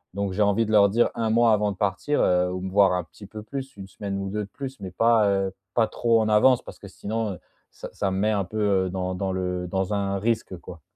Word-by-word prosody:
Donc, 100 -1 -2
j'ai 105 - -1
envie 105 +2 +3
de 110 - -4
leur 100 -2 +6
dire 115 +4 +2
1 115 -1 -1
mois 115 0 +4
avant 105 -1 +1
de 95 - -9
partir, 100 +9 -1
heu, 90 0 +2
ou 90 - -4
me 95 0 -5
voir 100 -1 +4
un 90 -1 -1
petit 80 +6 -14
peu 105 +1 -9
plus, 135 +4 -7
1 95 -1 -8
semaine 100 0 -5
ou 100 0 -4
2 105 +1 -3
de - - -18
plus, 135 0 -7
mais 95 -2 -6
pas, 115 +1 +3
heu, 95 -1 0 0.2
pas 115 - +4
trop 115 0 +1
en 110 - 0
avance, 120 +4 +4
parce - - -11
que - - -11
sinon, 110 0 -3
heu, 90 - -11 0.3
ça - - -10
ça 100 - -1
me 95 - -2
met 105 +3 +1
un 100 -2 0
peu, 100 +5 -7 0.3
heu, - - -4
dans 90 0 -3
dans 95 +1 -2
le 90 -1 -3
dans 95 +2 -2
un 100 -1 -1
risque, 110 -2 -1
quoi. 85 -1 -12
100 Hz, 275 wpm, -25 LUFS, 95-110 Hz, 0.3 s, leur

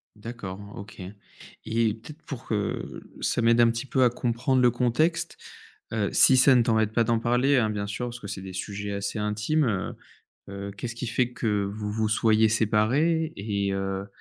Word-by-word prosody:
D'accord. 105 -3 -7 0.2
OK 100 -1 -10 0.6
et 115 -1 +1
peut-être 150 +8 -12
pour 130 -4 -8
que, 105 -2 -3 0.2
ça - - 0
m'aide 115 +1 +4
un 115 - +6
petit 115 +4 -4
peu 130 -1 +1
à 125 - +5
comprendre 125 +2 0
le 125 - +6
contexte, 125 +8 0 0.6
heu, 105 -3 0
si 130 - +7
ça 130 +1 +7
ne 120 - +5
t'embête 110 -2 +1
pas 115 - +3
d'en 115 0 +1
parler, 125 +4 +2
hein, 110 -3 +2
bien 100 -1 -3
sûr, 125 +4 -4
parce 120 0 -7
que 100 - -9
c'est 95 - -6
des 95 -1 -8
sujets 100 +2 -5
assez 100 +2 -3
intimes, 105 +9 0
heu 100 -5 -2 0.5
heu, 100 0 -6
qu'est-ce 120 +4 -6
qui 125 - -4
fait 125 +1 0
que 105 -4 -1
vous 105 +1 -4
vous 110 0 0
soyez 110 0 +3
séparés 125 +10 +1
et 100 -1 -2
heu 95 0 -3
110 Hz, 190 wpm, -26 LUFS, 105-125 Hz, 0.6 s, si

